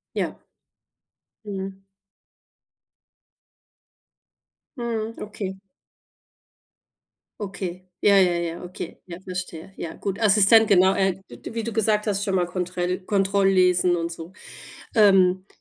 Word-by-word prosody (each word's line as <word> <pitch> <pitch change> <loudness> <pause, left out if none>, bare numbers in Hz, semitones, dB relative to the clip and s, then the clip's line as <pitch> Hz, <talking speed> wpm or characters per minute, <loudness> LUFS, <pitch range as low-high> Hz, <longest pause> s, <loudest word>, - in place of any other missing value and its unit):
Ja. - - -2 1.1
Mhm. 195 -1 -6 2.9
Mhm. 230 -2 -3
Okay. 195 -2 -6 1.8
Okay. 185 -2 -5 0.2
Ja, 200 -1 +5
ja, 185 -2 +5
ja, 170 0 -3
okay. 180 +1 -8
Ja, 175 -1 -9
verstehe. 180 -1 -7
Ja, 165 - -5
gut. 200 +1 -4
Assistent, 215 +1 +6
genau. 190 -1 +5
Äh, 190 -1 +1
d - - -10
wie 230 -1 -3
du 230 - -3
gesagt 215 -1 +1
hast, 200 -1 0
schon 195 -3 -1
mal 180 -1 +2
Kontrell 180 0 -2
Kontrolllesen 190 -3 +3
und 170 0 -3
so. 165 +2 -9 0.6
Ähm, 190 -3 +4
190 Hz, 110 wpm, -24 LUFS, 180-205 Hz, 2.9 s, Assistent